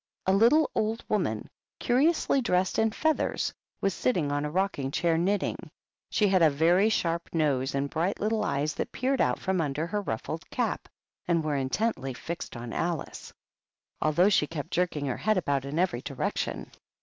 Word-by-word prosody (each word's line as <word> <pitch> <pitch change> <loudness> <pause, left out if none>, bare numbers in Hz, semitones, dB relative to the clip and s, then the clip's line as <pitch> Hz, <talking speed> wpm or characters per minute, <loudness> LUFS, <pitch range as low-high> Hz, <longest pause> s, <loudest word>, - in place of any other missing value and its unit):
A 190 - +3
little 240 +10 +4
old 220 +1 -1
woman, 170 - 0 0.3
curiously 275 +2 +2
dressed 185 -5 +1
in 220 0 +3
feathers, 315 +8 0 0.3
was 195 - +1
sitting 175 - 0
on 145 +1 -1
a - - -2
rocking 175 -5 -1
chair 165 +3 +1
knitting. 190 +5 -1 0.4
She 210 - +2
had 190 -2 +3
a 160 - +7
very 170 +8 +3
sharp 170 -5 -1
nose 140 -4 +1
and 140 +1 0
bright 165 +6 -1
little 215 +1 0
eyes 150 -4 0
that - - -4
peered 265 +1 0
out - - +2
from 190 -2 0
under 150 +1 -1
her 205 +4 -2
ruffled 115 - -5
cap - - -2 0.4
and 170 -2 +2
were 150 -1 -1
intently 135 - -1
fixed 170 -2 -6
on 120 -1 -6
Alice, 170 -3 -3 0.7
although 170 +6 +4
she 150 -7 +3
kept 150 -3 -6
jerking 170 -5 0
her 130 - -2
head 215 -2 +1
about 140 -6 0
in 140 +3 -4
every 175 -9 +1
direction. - - -3
170 Hz, 175 wpm, -28 LUFS, 145-205 Hz, 0.7 s, a